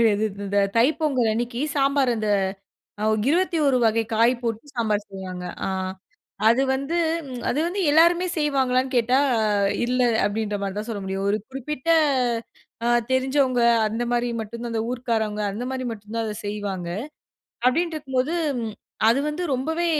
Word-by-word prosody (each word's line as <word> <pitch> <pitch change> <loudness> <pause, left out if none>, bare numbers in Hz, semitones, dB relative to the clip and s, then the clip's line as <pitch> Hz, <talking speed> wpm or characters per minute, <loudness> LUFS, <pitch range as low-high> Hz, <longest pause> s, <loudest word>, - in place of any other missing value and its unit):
கடையாது 210 -1 +3
இந் 200 +1 -11
இந்த 205 - +1 0.2
தை 230 - +6
பொங்கல் 260 -7 +2
அன்னைக்கு, 240 +2 -2 0.2
சாம்பார் 275 -2 +3
அந்த 215 -1 -2 1.0
21 320 -6 +2
வகை 225 0 +2
காய் 230 +3 +4
போட்டு 230 +2 -3
சாம்பார் 215 -3 0
செய்வாங்க. 185 -2 -7 0.2
அ - - -1 0.8
அது 245 +4 +4
வந்து 275 +6 -2 0.5
அது 265 - 0
வந்து 375 +4 -2
எல்லாருமே 340 +4 +5
செய்வாங்களான்னு 265 -3 +1
கேட்டா 245 +2 +3 0.7
இல்ல, 250 +1 0 0.3
அப்டின்ற 210 0 -2
மாரி 195 -1 -3
தான் 215 - -4
சொல்ல 205 - -4
முடியும். 195 +1 -3
ஒரு 205 - +2
குறிப்பிட்ட 270 +3 -5 1.0
அ - - +3 0.2
தெரிஞ்சவங்க 260 -1 +2 0.3
அந்த 225 +3 -3
மாரி 240 0 +1
மட்டும் 230 +2 -7
தான் 235 - -4
அந்த 225 -1 0
ஊர்க்காரவங்க 220 -4 -1
அந்த 230 +5 -4
மாரி 260 -1 -3
மட்டும் 210 0 -10
தான் 230 - 0
அத 210 - -4
செய்வாங்க. 200 -4 -4 0.8
அப்டின் 330 +7 +2
இருக்கும்போது 270 +1 -1 0.7
அது 235 +4 +4
வந்து 300 +4 -3
ரொம்பவே 320 +7 -1
240 Hz, 145 wpm, -24 LUFS, 215-275 Hz, 1.0 s, தை